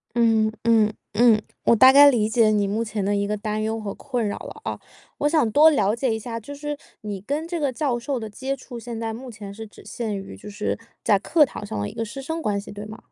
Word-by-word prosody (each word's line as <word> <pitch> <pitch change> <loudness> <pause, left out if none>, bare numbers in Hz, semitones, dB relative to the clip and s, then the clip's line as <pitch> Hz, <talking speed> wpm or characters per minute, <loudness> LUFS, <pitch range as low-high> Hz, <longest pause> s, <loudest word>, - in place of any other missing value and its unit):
嗯， 225 -2 +3
嗯， 220 -2 +4 0.2
嗯， 230 -3 +5 0.2
我 235 - +5
大 260 +4 +8
概 285 +1 +9
理 220 -4 +1
解 220 -1 +4
你 205 -2 +2
目 215 +3 -1
前 215 -2 -3
的 205 +1 +1
一 200 0 0
个 210 0 -1
担 215 0 -3
忧 220 +1 -2
和 200 -2 -5
困 245 -6 -3
扰 205 - -3
了 - - -10
啊。 - - -4 0.4
我 295 - +2
想 300 -8 +2
多 310 +5 +7
了 210 -7 +2
解 235 -2 0
一 - - -2
下， 230 0 -5
就 285 +6 -9
是 295 0 -4 0.2
你 205 -3 -5
跟 295 +9 -3
这 340 -1 -3
个 280 -3 0
教 255 -3 -1
授 265 +1 -3
的 220 -1 -6
接 265 +6 -3
触 250 -2 -9
现 230 -1 -6
在 225 -1 -3
目 250 +2 -8
前 205 -2 -9
是 220 +1 -8
只 - - -16
限 220 -4 -4
于 195 - -8
就 210 - -10
是 205 +1 -3 0.2
在 200 -2 +4
课 305 - +4
堂 210 - -8
上 105 - -4
的 105 - -2
一 - - -11
个 225 - -3
师 255 +5 -7
生 320 +4 -4
关 205 -5 0
系， 200 - -9
对 205 +1 -7
吗？ 215 +1 -9
225 Hz, 285 characters per minute, -23 LUFS, 210-265 Hz, 0.4 s, 概